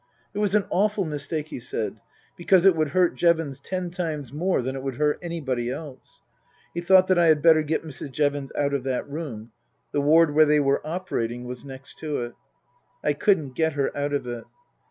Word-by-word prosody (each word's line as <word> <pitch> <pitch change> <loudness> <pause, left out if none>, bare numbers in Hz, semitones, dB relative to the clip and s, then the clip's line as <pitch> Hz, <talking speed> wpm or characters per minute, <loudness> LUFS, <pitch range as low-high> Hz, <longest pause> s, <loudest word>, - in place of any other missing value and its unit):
It - - -4
was 205 -1 +1
an 210 - +3
awful 205 0 +1
mistake, 150 0 -4
he 155 - -6
said, 110 -3 -4 0.3
because 180 +1 +3
it 190 -3 +7
would 155 -1 +1
hurt 180 +3 +2
Jevons 165 -5 +1
ten 180 +3 -4
times 155 -8 -4
more 170 -2 0
than 130 +2 -3
it 135 - -5
would 135 -1 -4
hurt 150 +1 +1
anybody 135 -9 -3
else. 135 0 -8 0.5
He 170 - -3
thought 185 +1 +6
that 185 -2 +3
I 170 - +5
had 155 -2 +4
better 160 -2 +6
get 155 +1 -1
Mrs. 140 -2 -7
Jevons 145 -1 -1
out 140 -1 +1
of 140 -3 -1
that 130 -2 -2
room; 135 -7 -6 0.4
the 145 - +1
ward 155 +1 +5
where 155 +1 +6
they 150 0 +4
were 140 -1 +2
operating 135 -8 -3
was 125 0 -7
next 135 0 -11
to 150 -5 -2
it. 120 - -7 0.7
I 150 - +2
couldn't 150 -4 +1
get 160 +2 +1
her 140 -1 -1
out 145 0 -2
of 145 - -1
it. 120 -1 -6
150 Hz, 205 wpm, -25 LUFS, 135-170 Hz, 0.7 s, it